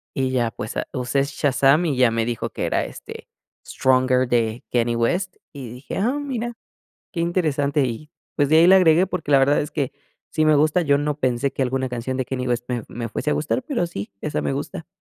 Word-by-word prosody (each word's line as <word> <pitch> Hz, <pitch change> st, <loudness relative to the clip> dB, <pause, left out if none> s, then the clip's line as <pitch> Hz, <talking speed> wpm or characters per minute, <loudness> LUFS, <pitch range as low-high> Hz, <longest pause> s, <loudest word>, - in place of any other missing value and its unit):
y 130 Hz, -1 st, 0 dB
ya, 120 Hz, -3 st, +1 dB
pues, 110 Hz, -1 st, -6 dB
ah, -, -, -2 dB
usé 130 Hz, +1 st, 0 dB
Shazam 140 Hz, +3 st, +2 dB
y 150 Hz, -5 st, 0 dB
ya 125 Hz, -2 st, +5 dB
me 115 Hz, 0 st, 0 dB
dijo 120 Hz, 0 st, -3 dB
que -, -, -4 dB
era, -, -, 0 dB
este, -, -, -10 dB, 0.4 s
Stronger 130 Hz, -1 st, +2 dB
de 115 Hz, -1 st, 0 dB
Kanye 120 Hz, -1 st, +2 dB
West 175 Hz, +11 st, 0 dB, 0.2 s
y 135 Hz, -5 st, -7 dB
dije: 125 Hz, +3 st, -7 dB
"Ah, 240 Hz, +8 st, +1 dB
mira, 240 Hz, -5 st, -3 dB, 0.6 s
qué 175 Hz, -, -3 dB
interesante", 150 Hz, -5 st, +1 dB
y 130 Hz, +5 st, -5 dB, 0.2 s
pues, 145 Hz, -1 st, +2 dB
de 155 Hz, -, +5 dB
ahí 165 Hz, -, +7 dB
la 190 Hz, +1 st, +8 dB
agregué, 175 Hz, 0 st, +5 dB
porque 160 Hz, -5 st, -4 dB
la 140 Hz, -, +6 dB
verdad 135 Hz, +2 st, +3 dB
es 150 Hz, -, -4 dB
que 140 Hz, -3 st, -2 dB, 0.4 s
sí 155 Hz, -1 st, +1 dB
me 155 Hz, -, +5 dB
gusta, 155 Hz, +4 st, +3 dB
yo 145 Hz, -3 st, +3 dB
no 145 Hz, 0 st, -2 dB
pensé 130 Hz, +2 st, 0 dB
que -, -, -5 dB
alguna 130 Hz, 0 st, -1 dB
canción 125 Hz, +2 st, -3 dB
de 130 Hz, -, -1 dB
Kanye 125 Hz, 0 st, -3 dB
West 120 Hz, 0 st, -1 dB
me 120 Hz, -2 st, -2 dB
me 115 Hz, -1 st, -5 dB
fuese 130 Hz, -, -3 dB
a -, -, +2 dB
gustar, 155 Hz, -, -1 dB
pero 245 Hz, -, -1 dB
sí, 100 Hz, -12 st, -6 dB
esa 150 Hz, -, -2 dB
me -, -, -1 dB
gusta. 150 Hz, +3 st, -5 dB
140 Hz, 225 wpm, -22 LUFS, 125-155 Hz, 0.6 s, la